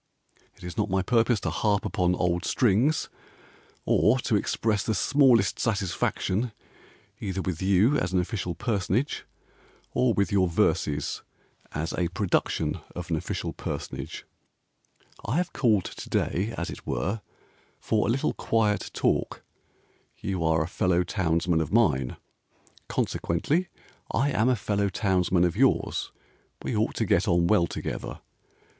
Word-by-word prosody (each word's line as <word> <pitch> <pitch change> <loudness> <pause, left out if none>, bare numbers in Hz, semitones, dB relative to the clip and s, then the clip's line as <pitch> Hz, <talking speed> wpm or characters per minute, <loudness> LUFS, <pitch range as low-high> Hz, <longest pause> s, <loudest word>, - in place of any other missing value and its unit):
It - - -18
is 90 0 -7
not - - +1
my 95 0 +1
purpose 115 +1 +2
to - - -1
harp 105 -2 +1
Upon 90 -4 +1
old 90 0 0
strings, 125 +9 +2 0.8
Or 110 +5 +4
to 110 - +1
express 105 +1 0
the 110 - -1
smallest 125 -4 +4
satisfaction 105 +1 -1 0.7
Either 95 -2 -3
with 90 -4 -3
you 100 +9 +4
as 90 - -2
an 95 - +2
official 90 -2 -2
personage 105 - -1 0.7
Or 125 -1 +3
with 100 -3 +1
your 95 -2 +3
verses 75 -3 0 0.5
as 80 +2 -3
a 90 - 0
production 90 +2 0 0.2
of 90 -1 -6
an - - +3
official 80 - -3
personage; - - -6 1.0
I 125 +8 -1
have 180 0 -1
called 110 -8 +2
to - - -8
day, 100 +6 0
as - - -3
it - - -10
were, 100 - -1 0.6
For 110 -1 +1
a - - 0
little 130 +4 +1
quiet 105 -4 0
talk: - - 0 0.7
You 95 -4 -3
are 80 0 +2
a - - -4
fellow 90 0 +1
townsman 85 -2 +1
of 80 - -3
mine, 75 - +2 0.7
Consequently 150 - 0 0.4
I 140 +2 +1
am 115 0 +2
a 130 - +3
fellow 100 -1 0
townsman 90 -2 +1
of 90 -1 +1
yours; 135 +4 +1 0.5
We - - -2
ought - - 0
to - - 0
get - - +2
on 85 0 +3
well 85 -2 +3
together. - - -5
95 Hz, 145 wpm, -27 LUFS, 90-115 Hz, 1.0 s, Or